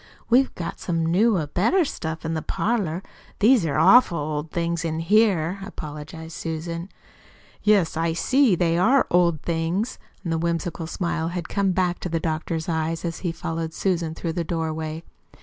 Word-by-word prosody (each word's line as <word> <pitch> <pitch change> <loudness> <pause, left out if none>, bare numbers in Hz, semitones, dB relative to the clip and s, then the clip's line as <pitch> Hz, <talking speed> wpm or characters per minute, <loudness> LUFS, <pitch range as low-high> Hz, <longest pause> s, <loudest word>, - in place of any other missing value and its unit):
"We've 260 +3 +5
got 170 - -5
some 165 -2 -1
newer, 185 0 +3
better 225 - +2
stuff 160 - -5
in 160 - -1
the 160 - -2
parlor. 195 -3 -1 0.3
These 220 -5 +4
are 145 - -1
awful 185 +2 +6
old 150 +1 -3
things 170 +1 -1
in 160 -1 -2
here," 190 -1 +2
apologized 160 -2 -8
Susan. 165 +2 -4 0.7
"Yes, 205 -6 +3
I 165 0 0
see 255 +4 +3
they 170 -1 +1
are 260 +9 +4
old 170 -3 +3
things." 170 +7 -1 0.3
The 165 -1 0
whimsical 170 0 -2
smile 170 -2 -2
had 175 +1 -4
come 200 -2 +1
back 180 -1 0
to 180 - -4
the 165 0 0
doctor's 160 0 -2
eyes 165 0 -1
as 165 0 -3
he 175 - -2
followed 165 0 -4
Susan 170 -4 -1
through 165 -1 -3
the 170 0 -1
doorway. 160 -1 -3
170 Hz, 165 wpm, -24 LUFS, 160-185 Hz, 0.7 s, awful